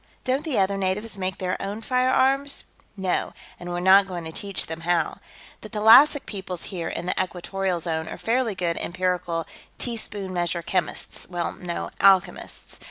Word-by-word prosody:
"Don't 265 +3 0
the 310 -7 -1
other 195 0 +2
natives 195 +4 -1
make 190 -1 -3
their 185 -1 -2
own 200 +2 -4
firearms?" 260 +3 +2 0.3
"No, 190 -2 -1 0.3
and 175 - -7
we're 175 0 -2
not 195 +2 +7
going 175 -2 -5
to 160 - -6
teach 200 +3 -2
them 160 0 -6
how. 175 +1 0 0.4
The 215 - -9
thalassic 235 +7 +7
peoples 190 -4 -6
here 170 -3 -3
in 170 - -4
the 180 - +1
Equatorial 185 0 -2
Zone 160 -1 -2
are - - -6
fairly 230 -2 0
good 175 -3 -1
empirical, 175 -2 -1 0.3
teaspoon 210 -5 -3
measure, 175 -1 -1
chemists. 175 -1 -2
Well, 175 -1 -2
no, 175 -1 -5
alchemists. 195 -1 +2
190 Hz, 165 wpm, -25 LUFS, 175-215 Hz, 0.4 s, not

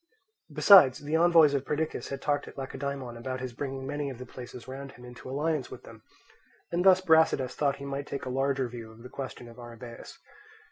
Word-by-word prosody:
Besides, 180 -11 +7
the 150 +2 -3
envoys 165 -3 +6
of 140 -2 0
Perdiccas 155 +2 -3
had 140 -1 -6
talked 145 -1 0
at - - -12
Lacedaemon 135 -2 -5
about 130 +2 -5
his 130 -1 -5
bringing 135 +1 -5
many 145 +1 -3
of 130 - -8
the 125 - -8
places 125 -1 -10
round 135 +1 -8
him 125 - -14
into 125 +1 -11
alliance 150 0 -1
with - - -10
them; - - -13 0.7
and 175 +1 0
thus 185 -1 +6
Brasidas 160 -7 +3
thought 140 0 0
he 140 - -9
might 140 +1 -4
take 140 - -5
a - - -4
larger 135 0 0
view 115 -2 -9
of 110 +1 -15
the 125 - -10
question 130 -3 -7
of 115 +1 -13
Arrhabaeus. 120 0 -10
135 Hz, 205 wpm, -28 LUFS, 125-145 Hz, 0.7 s, Besides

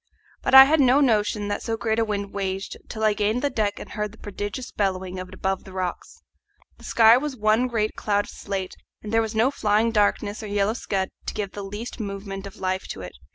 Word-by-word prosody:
But - - +2
I 265 - +13
had 305 +3 +3
no 265 0 +5
notion 210 -5 +2
that 205 - -2
so 225 -1 -2
great 220 +1 0
a - - +3
wind 200 -2 -3
raged 195 0 -3
till 220 -1 -5
I 215 -1 +4
gained 215 +4 0
the 285 - +1
deck 210 -4 -1
and - - -9
heard 210 -1 -3
the 225 - -16
prodigious 205 +5 -6
bellowing 185 -2 -2
of 185 - -6
it 185 - -11
above 190 0 -2
the 190 - -12
rocks. 185 -1 -5 0.6
The - - -16
sky 225 +1 +6
was 290 0 -3
one 215 +2 +2
great 215 -3 -1
cloud 205 -1 0
of - - -11
slate, 195 -2 -4 0.3
and 215 +1 -6
there 225 - +4
was 220 0 -3
no 235 +5 +3
flying 220 -2 +2
darkness 205 0 +1
or 215 - -6
yellow 205 +1 +1
scud 195 -5 -2 0.2
to - - -3
give 205 -3 -3
the 205 - -7
least 205 +6 -7
movement 195 -1 -5
of 195 - -11
life 185 0 -2
to 95 - -6
it. 90 -1 -8
210 Hz, 235 wpm, -24 LUFS, 195-225 Hz, 0.6 s, I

